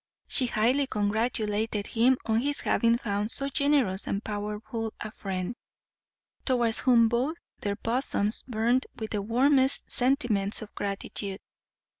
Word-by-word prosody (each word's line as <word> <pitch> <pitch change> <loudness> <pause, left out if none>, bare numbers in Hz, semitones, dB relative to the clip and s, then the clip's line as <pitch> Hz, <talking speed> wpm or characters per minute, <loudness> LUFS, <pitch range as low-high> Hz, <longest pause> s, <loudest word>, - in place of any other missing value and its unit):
She 255 - +3
highly 245 +6 +1
congratulated 215 -1 -1
him 245 +3 +2
on 225 0 +1
his 285 +2 -1
having 230 0 +2
found 205 -2 -2
so 275 +3 +1
generous 280 -9 +1
and 200 +2 -2
powerful 210 +2 -5
a 215 - -6
friend, 190 +2 -4 0.9
towards 240 -4 +2
whom 235 -3 +4
both 250 +8 -1 0.2
their 205 -1 -2
bosoms 225 -2 0
burnt 240 +2 0
with 220 -1 -6
the 210 - -1
warmest 265 +5 +3
sentiments 240 -6 +2
of 210 - -13
gratitude. 200 0 -4
225 Hz, 130 wpm, -27 LUFS, 210-255 Hz, 0.9 s, whom